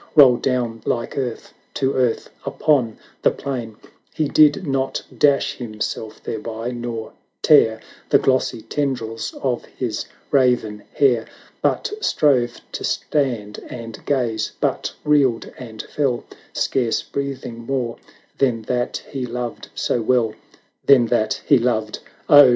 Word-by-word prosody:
Roll 130 -5 +8
down 120 -3 -1
like 115 -1 -2
earth 125 -4 -4 0.2
to 135 0 +1
earth 125 -3 +1 0.2
upon 125 -8 +1 0.2
the - - +5
plain; 120 -5 -4 0.4
He 155 -2 0
did 150 +5 +5
not 135 -2 -1
dash 140 -1 +3
himself 110 -1 -5
thereby, 115 +2 -4
nor 120 -2 -5 0.3
tear 110 -8 +6 0.3
The - - +7
glossy 130 -4 +1
tendrils 115 -4 -2
of 125 -3 0
his 120 -5 -4 0.3
raven 125 -6 +2
hair. 125 -5 +3 0.3
But - - +1
strove 130 - +2
to - - -5
stand 120 -8 -1
and 115 -2 -8
gaze, 115 -6 0
but - - 0
reeled 140 -6 +2
and 110 -4 -7
fell, 135 -5 -1 0.3
Scarce 120 -4 0
breathing 135 -4 -4
more 120 -1 -2 0.4
than 120 -5 +2
that 120 +2 -2
he 130 -3 -3
loved 120 -1 -5
so 120 - 0
well. 115 -1 +2 0.5
Than 135 -4 +6
that 110 -2 +1
he 140 - +5
loved! 110 -3 0 0.3
Oh! 145 -3 +9
125 Hz, 130 wpm, -21 LUFS, 115-135 Hz, 0.5 s, Oh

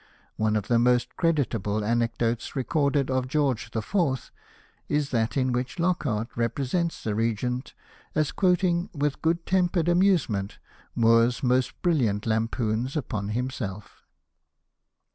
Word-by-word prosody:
One 110 0 +1
of 105 -2 -1
the 120 -1 +3
most 125 0 +2
creditable 115 - 0
anecdotes 115 0 -1
recorded 140 0 +1
of 130 -1 0
George 135 -6 0
IV., 135 - -1 0.6
is 150 -1 0
that 115 +2 0
in 130 -1 +1
which 125 +6 -2
Lockhart 150 -11 0
represents 135 +8 -1
the 110 - -1
Regent 115 +4 -2 0.4
as 155 -2 +1
quoting 180 -2 +1
with 145 -1 -1
good 165 +1 0
tempered 180 -2 +1
amusement 175 - +2 0.4
Moore's 115 +2 +3
most 125 0 +1
brilliant 120 - +1
lampoons 115 +3 -1
upon 105 -7 -3
himself. 110 -4 -4
125 Hz, 120 wpm, -26 LUFS, 115-155 Hz, 0.6 s, the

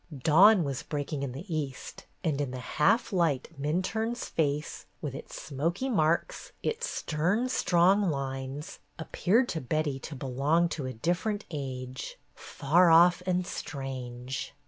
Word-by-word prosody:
Dawn 180 - +6
was 140 -3 -3
breaking 145 -1 -4
in 140 -2 -3
the 135 +8 -8
east, 140 -4 -5 0.2
and 150 -5 0
in 140 - -2
the 130 - -6
half 155 - +1
light 165 -8 +1
Minturne's 220 - -1
face, 150 -1 -2
with 145 -4 -4
its 135 - -8
smoky 170 - -2
marks, 170 - 0
its 475 +2 -1
stern 180 +11 0
strong 190 -2 +3
lines, 135 0 -4 0.2
appeared 195 +8 +1
to 160 - -2
Betty 145 +1 -1
to 150 - -8
belong 140 +6 +1
to 145 -6 -4
a 130 - -4
different 180 - -1
age, 130 -3 -5 0.2
far 170 +6 +2
off 175 +2 +6
and 180 0 +1
strange. 130 -4 -5
155 Hz, 140 wpm, -29 LUFS, 135-180 Hz, 0.2 s, Dawn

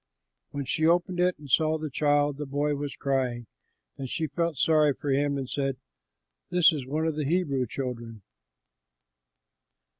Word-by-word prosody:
When 140 -1 -4
she 160 +4 +1
opened 175 +1 +2
it 180 0 +2
and 150 - -12
saw 155 +4 +3
the 155 -2 -5
child, 145 0 +2
the 150 -1 -5
boy 145 +2 0
was 145 0 -4
crying; 130 -3 -1 0.5
and 135 -2 -4
she 160 - -1
felt 165 +1 -2
sorry 150 0 +3
for 145 0 -3
him 140 +1 +1
and 135 -2 -4
said, 135 0 -2 0.7
"This 180 -2 +5
is 135 -4 -4
one 155 +4 -1
of 160 -2 0
the 155 - -1
Hebrew 140 -6 0
children." 120 -4 -6
145 Hz, 160 wpm, -27 LUFS, 135-155 Hz, 0.7 s, This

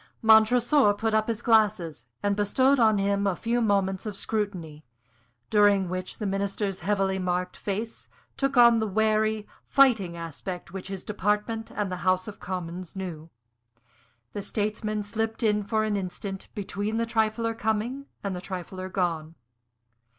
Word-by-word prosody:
Montresor 220 +2 +5
put 220 +1 -1
up 215 0 +2
his 225 -2 -3
glasses 200 - +2 0.2
and 205 0 +2
bestowed 260 +7 +3
on 220 -3 +5
him 200 0 +1
a 190 - +1
few 235 +5 0
moments 195 -2 +1
of 210 - -4
scrutiny, 185 -8 -3 0.7
during 205 -3 +4
which 185 0 -4
the 210 - -4
Minister's 195 0 -2
heavily 195 -1 0
marked 180 0 -1
face 210 +3 -4 0.3
took 275 -1 -1
on 235 -1 +7
the 220 - 0
wary, 215 +1 +1 0.2
fighting 220 -11 +4
aspect 170 +2 -6
which 190 -2 -6
his 195 -1 -6
department 210 +2 -1
and 205 -2 -3
the 180 - -3
House 185 +1 +1
of 210 - -8
Commons 180 -1 -5
knew. 170 -4 -6 1.0
The 205 - -3
statesman 215 0 -2
slipped 225 +2 -3
in 210 -1 +3
for 215 +2 0
an 215 -1 0
instant 195 0 -5
between 205 +2 -3
the 230 - +1
trifler 225 0 0
coming 225 +6 -2 0.2
and 200 -2 -2
the 180 - -5
trifler 185 0 -6
gone. 165 -4 -2
205 Hz, 150 wpm, -27 LUFS, 185-220 Hz, 1.0 s, on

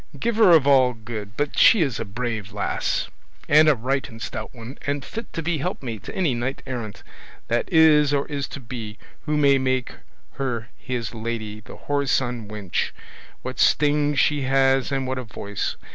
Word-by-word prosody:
Giver 225 -3 +4
of 150 -4 +4
all 130 -3 +5
good! 110 -2 -8
but 145 0 -1
she 220 -8 +7
is 135 -6 -2
a - - -3
brave 110 -1 -4
lass, 105 0 -1 0.4
and 155 +1 +6
a 150 - +5
right 130 +4 -1
and 115 -2 -11
stout - - -5
one, 120 +2 -10
and 140 -1 -1
fit 230 0 -7
to 165 - -3
be 165 -1 0
helpmate 130 - -4
to - - -7
any 170 -8 +1
knight 120 +3 -3
errant 120 -6 -6 0.5
that 120 +8 0
is 155 -3 +6
or 140 -1 +1
is 140 -2 -3
to - - -8
be, 115 -3 -7 0.3
who 150 0 +1
may 140 -2 +5
make 130 -1 -1 0.4
her 120 -5 -3
his 120 -4 -4
lady: 110 -2 -4
the 110 - -12
whoreson 130 -5 0
wench, 105 -4 -2 0.5
what - - -6
sting 150 0 +3
she 145 +1 +2
has 135 0 +2
and 135 -1 -1
what 130 0 -2
a - - -4
voice! 105 -3 -4
130 Hz, 180 wpm, -23 LUFS, 115-145 Hz, 0.5 s, she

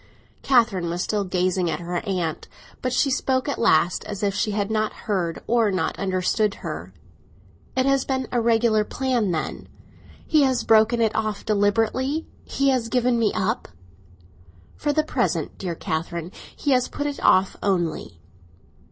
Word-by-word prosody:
Catherine 225 -9 +2
was 175 +2 -2
still 210 -2 -1
gazing 185 -1 0
at 155 -1 -2
her 175 +1 -3
aunt, 180 -6 -3 0.3
but 255 - -1
she 270 +2 +2
spoke 260 +1 0
at 285 - -2
last, 175 -6 +3
as 205 -1 -6
if 200 -1 +1
she 205 +2 0
had 205 0 -1
not 215 0 0
heard 180 -6 -1
or 230 -2 +2
not 185 -2 -1
understood 195 +2 0
her. 85 +4 -5 0.9
"It 260 - +3
has 275 -1 +3
been 260 -1 -2
a 245 - +1
regular 225 -1 +3
plan, 250 -3 -1
then. 160 -3 -3 0.6
He 310 -2 +3
has 260 -4 +2
broken 225 +2 +4
it 225 -1 +2
off 215 -2 -2
deliberately; 225 +8 +1 0.2
he 275 0 0
has 250 -4 0
given 250 -1 +2
me 220 -3 +2
up." 215 +5 -1 1.1
"For 295 - -1
the 310 +1 +2
present, - - -1
dear 175 -3 -3
Catherine. 165 +2 -4 0.2
He 290 - -1
has 255 -1 +3
put 290 - -4
it 290 -1 -3
off 185 +1 +4
only." 170 - -1
215 Hz, 160 wpm, -23 LUFS, 185-250 Hz, 1.1 s, broken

